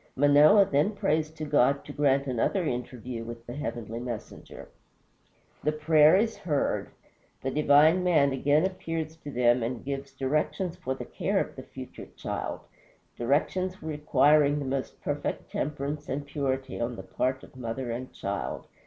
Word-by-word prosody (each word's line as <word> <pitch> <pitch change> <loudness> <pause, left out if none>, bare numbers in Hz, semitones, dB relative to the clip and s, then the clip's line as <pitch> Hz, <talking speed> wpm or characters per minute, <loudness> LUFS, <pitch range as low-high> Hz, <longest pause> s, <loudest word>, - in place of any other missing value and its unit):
Manoah 145 +8 +6
then 150 +7 +1
prays 155 -5 +1
to 155 0 -7
God 140 -1 +2
to 145 - -8
grant 140 -1 +2
another 135 - 0
interview 125 -2 -4
with 115 0 -8
the 120 - -7
heavenly 120 -5 -5
messenger. 120 -3 -7 1.0
The 150 - +2
prayer 155 +1 +5
is 220 +3 +1
heard; 150 -5 -1 0.5
the 135 - -1
divine 150 +5 +5
Man 155 -6 +4
again 145 +5 +2
appears 165 -4 -3
to 150 - -9
them 120 -2 +3
and 120 +2 -3
gives 140 0 -4
directions 150 +7 -1
for 130 -7 -3
the - - -7
care - - -1
of - - -3
the - - -7
future - - -10
child, - - -4 0.5
directions 180 +9 0
requiring 150 -1 +3
the 145 - -3
most 135 0 -3
perfect - - -3
temperance 145 +1 -3
and 145 +1 -3
purity 135 -3 -3
on 120 +1 -2
the 95 - -8
part 130 +7 -2
of - - -13
both 130 - -15
mother 120 +1 -3
and 125 +2 -5
child. - - -4
140 Hz, 160 wpm, -28 LUFS, 130-155 Hz, 1.0 s, Manoah